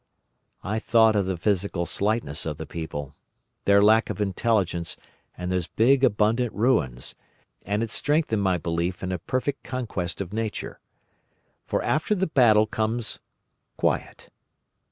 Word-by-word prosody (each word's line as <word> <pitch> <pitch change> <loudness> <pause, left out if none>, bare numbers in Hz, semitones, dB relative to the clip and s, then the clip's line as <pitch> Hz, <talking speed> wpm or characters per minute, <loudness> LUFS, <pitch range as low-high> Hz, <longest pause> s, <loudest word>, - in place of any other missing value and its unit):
"I 110 +3 -1
thought 110 -1 +4
of 100 -2 +1
the 95 -2 -2
physical 95 -1 0
slightness 100 -7 0
of - - -4
the - - -6
people, 75 -4 -6 0.5
their 100 0 +5
lack 110 +2 +4
of - - -4
intelligence, 95 -4 0 0.4
and 90 0 -4
those 90 -2 -1
big 130 +4 +3
abundant 110 +1 +2
ruins, 85 - 0 0.5
and 105 +3 0
it 115 - -4
strengthened 145 -8 +1
my 95 -2 +2
belief 85 +2 -2
in 95 - -2
a 90 - -2
perfect 130 - -2
conquest 110 -9 -4
of 100 0 -5
Nature. 110 -1 -4 0.9
For - - -1
after 155 +8 +1
the 190 -1 +1
battle 115 - +5
comes 110 +1 -2 0.6
Quiet. - - -2
105 Hz, 140 wpm, -25 LUFS, 90-115 Hz, 0.9 s, their